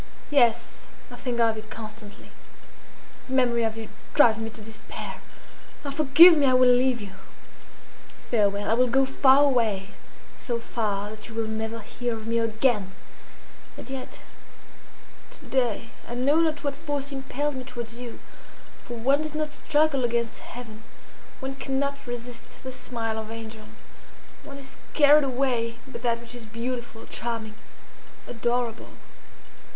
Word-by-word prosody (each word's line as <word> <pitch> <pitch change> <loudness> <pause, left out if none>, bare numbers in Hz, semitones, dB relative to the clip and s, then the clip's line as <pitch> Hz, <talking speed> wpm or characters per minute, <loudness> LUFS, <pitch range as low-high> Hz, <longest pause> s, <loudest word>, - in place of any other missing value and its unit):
"Yes, 235 -4 +2 0.2
I - - -7
think 245 -3 -3
of 225 -1 +4
you 215 - -5
constantly. 215 -1 -9 1.0
The 260 - -5
memory 240 -2 +3
of 225 -1 -1
you 225 -1 -6 0.3
drives 230 -6 +6
me 225 0 -3
to 225 - -8
despair. 220 +1 -8 0.6
Ah! 280 - -2
forgive 310 +5 +8
me! 290 -3 +3
I 255 - +4
will 255 0 +6
leave 250 0 +3
you! 200 -2 -7 1.2
Farewell! 205 -3 +2
I - - +3
will 250 +2 +4
go 270 +2 +3
far 270 +1 +5
away, 225 -8 +2 0.5
so 240 -2 -3
far 210 -3 -2
that 215 +1 -8
you 225 - -10
will 225 0 0
never 220 +1 -3
hear 240 +2 -3
of 220 -1 -8
me 230 +1 +1
again; 220 -4 +1 0.8
and - - -9
yet 265 -1 -7 1.2
to - - -16
day 235 -3 0 0.2
I 240 - -5
know 275 +5 +3
not 315 -2 +2
what 285 -1 -1
force 285 -1 -3
impelled 275 +2 -2
me 260 -1 -5
towards 235 -2 -7
you. 240 -2 -7 0.7
For 240 - -6
one 270 +6 +3
does 310 -1 -5
not 305 -1 -1
struggle 295 -2 +2
against 235 -1 0
Heaven; 225 -3 -10 0.6
one 265 +1 -3
cannot 280 0 -2
resist 240 0 -8
the 260 - -5
smile 235 -3 -3
of 220 0 -6
angels; 225 -1 -9 0.7
one 280 -1 -9
is 270 -1 -10 0.2
carried 295 0 +7
away 245 -3 0
by 265 - -8
that 235 -1 0
which 235 0 -10
is 240 -2 -9
beautiful, 235 0 -5
charming, 230 -2 -4 0.7
adorable." 235 0 -2
240 Hz, 150 wpm, -26 LUFS, 225-270 Hz, 1.2 s, forgive